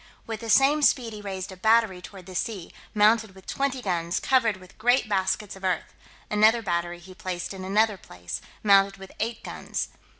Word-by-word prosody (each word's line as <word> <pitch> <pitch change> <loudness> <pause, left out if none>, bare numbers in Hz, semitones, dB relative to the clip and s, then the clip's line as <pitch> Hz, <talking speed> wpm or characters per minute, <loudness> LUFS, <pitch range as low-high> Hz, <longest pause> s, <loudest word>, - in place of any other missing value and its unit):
With 225 -1 -5
the 230 0 -7
same 275 +6 +5
speed 245 -5 +3
he 210 - -8
raised 195 -1 -5
a - - -9
battery 220 -1 +3
toward 185 0 -11
the 185 - -10
sea, 190 -2 -4 0.2
mounted 215 -1 +3
with 190 - -15
twenty 275 -2 -2
guns, 170 -2 -1
covered 230 -6 +2
with 185 +2 -17
great 245 +2 +3
baskets 195 0 -1
of 195 - -14
earth: 185 -2 -1 0.3
another 220 +2 +4
battery 175 -2 -1
he 180 +2 -13
placed 185 0 -5
in 190 -1 -8
another 210 +2 +2
place, 90 - -7 0.2
mounted 195 -1 +5
with 195 0 -11
eight 230 +1 -3
guns. - - -4
200 Hz, 190 wpm, -26 LUFS, 185-225 Hz, 0.3 s, same